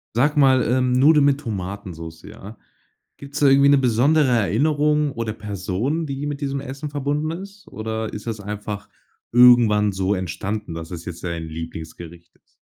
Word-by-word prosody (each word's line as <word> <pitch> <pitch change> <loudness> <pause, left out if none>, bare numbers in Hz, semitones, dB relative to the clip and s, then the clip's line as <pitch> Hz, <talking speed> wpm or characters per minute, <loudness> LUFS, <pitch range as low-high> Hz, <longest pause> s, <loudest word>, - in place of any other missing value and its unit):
Sag 145 +5 +2
mal, 130 -2 +5
ähm, 125 0 +2
Nudeln 145 +3 +5
mit 140 0 +2
Tomatensoße, 95 - -7
ja? 105 +4 -11 0.6
Gibt 140 0 -12
es 140 - -4
da 145 - +5
irgendwie 140 +1 +5
'ne 140 - +5
besondere 135 +5 +3
Erinnerung 145 +6 +1
oder 115 -2 -3
Person, 105 - -3
die 140 +1 -4
mit 145 0 -5
diesem 140 0 -2
Essen 140 +3 -7
verbunden 145 +2 -2
ist? 195 +4 -9
Oder 110 0 -4
ist 105 - -8
das 115 -2 -3
einfach 105 0 -6 0.4
irgendwann 120 -4 +6
so 95 +1 -1
entstanden, 95 +1 -4
dass 80 0 -7
es 85 -2 -8
jetzt 85 0 -8
dein 85 -1 -3
Lieblingsgericht 80 +1 -9
ist? - - -41
115 Hz, 165 wpm, -22 LUFS, 100-140 Hz, 0.6 s, irgendwann